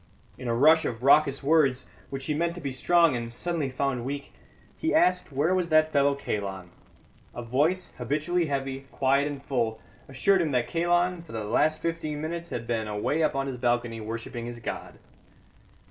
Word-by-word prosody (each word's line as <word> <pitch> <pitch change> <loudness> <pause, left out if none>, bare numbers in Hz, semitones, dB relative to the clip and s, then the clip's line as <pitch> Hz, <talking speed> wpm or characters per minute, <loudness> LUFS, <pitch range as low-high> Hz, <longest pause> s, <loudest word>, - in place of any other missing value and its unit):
In 125 - -7
a 115 - +1
rush 155 +6 +6
of 115 0 -4
raucous 140 0 +4
words, 140 -4 +3 0.2
which 135 -1 -5
he 150 - 0
meant 170 +3 -1
to - - -7
be 140 -2 -3
strong 165 +3 +3
and 115 0 -5
suddenly 165 -2 -2
found 130 -1 -1
weak, 140 +2 -5 0.4
he 320 0 -1
asked 180 - +3
where 145 +6 +1
was 180 -2 0
that 155 0 +4
fellow 140 0 +3
Kalon. 95 -8 -4 0.6
A 120 - -5
voice, 150 +10 0
habitually 155 +7 0
heavy, 135 -1 -3
quiet 140 +2 +2
and 140 -2 -6
full, 115 -4 -1 0.3
assured 185 +9 +3
him 160 - 0
that 125 -1 +1
Kalon 175 +1 +1
for 165 - -13
the 110 -1 -3
last 150 +9 +1
fifteen 165 -3 -2
minutes 170 +2 -4
had 115 - -4
been 115 -2 -2
away 105 +9 -1
up 155 -2 +1
on 135 0 0
his 135 -2 -4
balcony 120 -2 0
worshipping 115 +2 -5
his 120 0 -6
god. 115 - -6
140 Hz, 185 wpm, -27 LUFS, 120-160 Hz, 0.6 s, rush